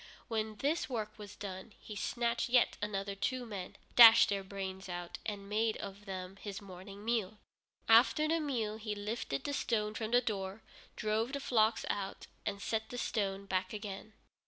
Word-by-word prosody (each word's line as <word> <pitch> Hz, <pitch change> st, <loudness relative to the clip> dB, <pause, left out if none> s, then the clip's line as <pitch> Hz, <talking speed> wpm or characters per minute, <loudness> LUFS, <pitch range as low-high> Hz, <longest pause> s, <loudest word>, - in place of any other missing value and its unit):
When 220 Hz, -1 st, -2 dB
this 290 Hz, +8 st, 0 dB
work 215 Hz, -3 st, -4 dB
was 205 Hz, -1 st, -9 dB
done 195 Hz, +1 st, -7 dB
he 210 Hz, -, -9 dB
snatched 235 Hz, +3 st, 0 dB
yet 245 Hz, 0 st, +4 dB
other 200 Hz, -1 st, -2 dB
two 250 Hz, +5 st, -2 dB
men, 200 Hz, -5 st, -6 dB, 0.2 s
dashed 230 Hz, -1 st, +10 dB
their 200 Hz, -1 st, 0 dB
brains 190 Hz, -1 st, -6 dB
out, 175 Hz, -1 st, -5 dB
and 200 Hz, -2 st, -4 dB
made 220 Hz, +2 st, +1 dB
of 200 Hz, +1 st, -8 dB
them 190 Hz, -1 st, -6 dB
his 200 Hz, -1 st, -6 dB
morning 195 Hz, +1 st, -10 dB
meal. 220 Hz, -3 st, 0 dB, 0.5 s
After 235 Hz, +7 st, +6 dB
the 330 Hz, +1 st, +2 dB
meal, 235 Hz, -8 st, -1 dB
he 215 Hz, -1 st, -4 dB
lifted 205 Hz, -9 st, -3 dB
the 285 Hz, -, -2 dB
stone 215 Hz, -5 st, 0 dB
from 220 Hz, 0 st, -3 dB
the 245 Hz, +1 st, +5 dB
door, 205 Hz, -3 st, -3 dB, 0.3 s
drove 220 Hz, +4 st, 0 dB
the 280 Hz, -, -1 dB
flocks 225 Hz, -4 st, +2 dB
out, 195 Hz, -1 st, -3 dB, 0.2 s
and 200 Hz, -1 st, -2 dB
set 220 Hz, -1 st, -1 dB
the 245 Hz, -, -6 dB
stone 200 Hz, -4 st, -1 dB
back 185 Hz, 0 st, -1 dB
again. 210 Hz, 0 st, -6 dB
210 Hz, 175 wpm, -34 LUFS, 195-230 Hz, 0.5 s, dashed